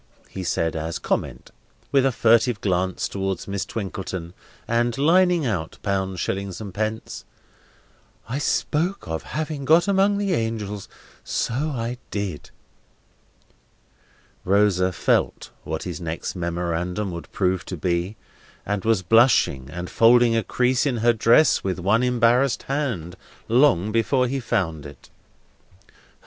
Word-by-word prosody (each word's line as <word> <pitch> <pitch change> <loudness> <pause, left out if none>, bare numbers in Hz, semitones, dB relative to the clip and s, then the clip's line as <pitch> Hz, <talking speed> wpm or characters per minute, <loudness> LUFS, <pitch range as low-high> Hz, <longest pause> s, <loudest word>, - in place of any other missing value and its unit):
he 95 - -5
said, 80 -2 -1
as 80 +1 -3
comment, - - -3 0.4
with 135 -1 +4
a - - +1
furtive 115 -1 +3
glance 95 -1 -1
towards 95 -2 -3
Miss 100 0 -3
Twinkleton, 95 -4 -5 0.3
and 120 0 0
lining 175 +2 +3
out 90 -9 -3
pounds, 95 -2 -1
shillings, 95 0 -3
and 100 -4 -7
pence: 110 +2 -4 1.0
"I 130 +5 -3
spoke 165 +5 -1
of 80 0 -3 0.2
having 155 -2 -3
got 160 +7 +4
among 200 +1 +3
the 200 -2 0
angels! 105 - -3 0.3
So - - -2
I 125 -3 -2
did!" 100 -7 -4 1.9
Rosa 95 -1 +2
felt - - 0
what 80 0 -4
his 90 -4 -6
next 80 +2 -4
memorandum 90 +3 -2
would 85 -1 -8
prove 95 -2 0
to 90 - -6
be, 90 +4 -1 0.5
and 105 -1 -2
was 110 -4 +2
blushing 90 - +3
and 90 +4 -6
folding 115 +2 +4
a 115 - +2
crease 125 +4 +1
in 125 -4 0
her 120 - +6
dress 115 +7 +4
with 95 -2 -2
one 100 +6 +2
embarrassed 125 +1 +2
hand, 120 - -3 0.3
long 115 -5 +3
before 125 +4 +2
he 135 +2 -2
found 90 - -1
it. 70 - -15
105 Hz, 130 wpm, -23 LUFS, 90-125 Hz, 1.9 s, her